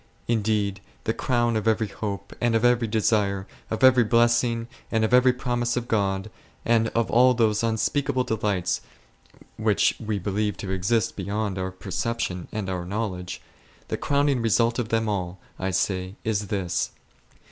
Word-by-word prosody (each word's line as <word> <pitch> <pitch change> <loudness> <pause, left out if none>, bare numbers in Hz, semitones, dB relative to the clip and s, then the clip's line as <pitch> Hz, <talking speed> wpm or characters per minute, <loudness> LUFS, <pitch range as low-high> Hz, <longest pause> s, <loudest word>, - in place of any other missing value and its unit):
Indeed, 105 -3 0 0.2
the 110 - 0
crown 120 -2 +1
of 110 0 -1
every 110 0 +2
hope, 100 -2 -5
and 120 -2 +2
of 115 +2 +2
every 120 -1 +3
desire, 105 -3 +1 0.2
of 110 +4 -3
every 130 -2 +7
blessing, 115 0 +2 0.2
and 110 -1 +2
of 110 - -2
every 125 0 +6
promise 120 -1 -1
of 120 -1 -2
God, 100 -2 0 0.3
and 115 -1 +3
of 115 0 +1
all 125 +2 +5
those 110 -2 +2
unspeakable 120 +4 0
delights 100 -6 -1 0.8
which - - +2
we 105 -1 -1
believe 105 +2 -1
to 95 - -5
exist 110 +5 0
beyond 100 0 -2
our 95 0 -2
perception 95 0 -3
and 105 -3 -3
our 90 -2 -2
know 105 +5 -2
ledge,— 90 -1 -7 0.5
the - - 0
crowning 140 -3 +1
result 115 +1 +2
of 115 -2 -2
them 115 -1 +1
all, 95 -3 -2 0.2
I 95 - -1
say, 95 0 -1
is 105 -2 -1
this. 90 -3 -1
110 Hz, 160 wpm, -25 LUFS, 100-120 Hz, 0.8 s, every